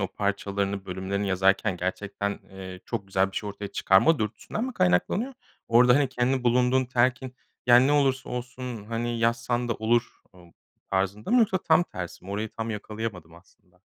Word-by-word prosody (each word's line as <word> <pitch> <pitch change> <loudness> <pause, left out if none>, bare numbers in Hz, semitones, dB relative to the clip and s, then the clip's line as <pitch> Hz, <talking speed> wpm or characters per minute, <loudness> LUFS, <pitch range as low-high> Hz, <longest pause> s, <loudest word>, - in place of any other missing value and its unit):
o 95 - 0
parçalarını, 100 -1 -2
bölümlerini 95 +2 -3
yazarken 95 +1 +2
gerçekten, 100 +3 -3
eee, 95 -1 -9
çok 100 - -4
güzel 95 0 +1
bir - - -12
şey 105 - -2
ortaya 100 0 -6
çıkarma 115 +15 +4
dürtüsünden 110 - -3
mi 260 - -4
kaynaklanıyor? 185 - +1 0.4
Orada, 125 +1 +6
hani, 140 -2 +2
kendi 130 0 0
bulunduğun 125 +2 +3
telkin, 130 +1 0 0.3
yani 125 +1 +7
ne 145 - +2
olursa 135 -3 +2
olsun, 125 -2 -6
hani, 115 +2 -3
yazsan 120 +1 0
da 115 - 0
olur, 115 +2 0
ımm, 90 -2 -18 0.4
tarzında 95 - -1
mı 250 - +5
yoksa 215 -5 +3
tam 165 0 +3
tersi 90 - -8
mi, 95 - -8
orayı 105 +2 -2
tam 110 +2 -5
yakalayamadım 105 -6 -6
aslında. 90 +1 -23
110 Hz, 170 wpm, -26 LUFS, 95-125 Hz, 0.4 s, yani